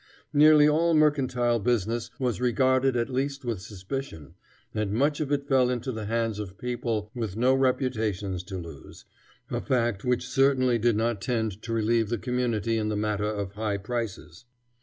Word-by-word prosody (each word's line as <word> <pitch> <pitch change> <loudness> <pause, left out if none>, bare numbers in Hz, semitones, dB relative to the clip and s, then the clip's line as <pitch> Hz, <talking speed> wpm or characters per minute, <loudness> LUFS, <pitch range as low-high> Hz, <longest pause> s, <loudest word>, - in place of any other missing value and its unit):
Nearly 150 0 +7
all 165 +2 +3
mercantile 130 -6 +2
business 115 0 0
was 125 -4 -1
regarded 130 +2 +2
at 115 - 0
least 135 +1 -3
with 115 -6 -2
suspicion, 100 - -7 0.4
and 105 -2 -1
much 145 +6 +1
of 150 -2 -2
it 140 -1 0
fell 130 -3 +3
into 125 +1 -2
the 110 -3 -5
hands 115 -1 -1
of 95 -2 -7
people 115 -3 -3
with 110 -5 -4
no 125 +3 +4
reputations 110 -8 0
to 95 -1 -6
lose, 85 -5 -10 0.5
a - - -1
fact 120 -6 0
which 125 -1 0
certainly 130 -3 +3
did 115 0 +2
not 115 -2 0
tend 110 -3 -2
to 115 - -6
relieve 115 -1 +1
the 120 - 0
community 115 -2 -1
in 105 0 -1
the 105 - -1
matter 105 0 -1
of 100 -2 -3
high 105 0 -2
prices. 110 -2 -5
120 Hz, 170 wpm, -27 LUFS, 105-130 Hz, 0.5 s, Nearly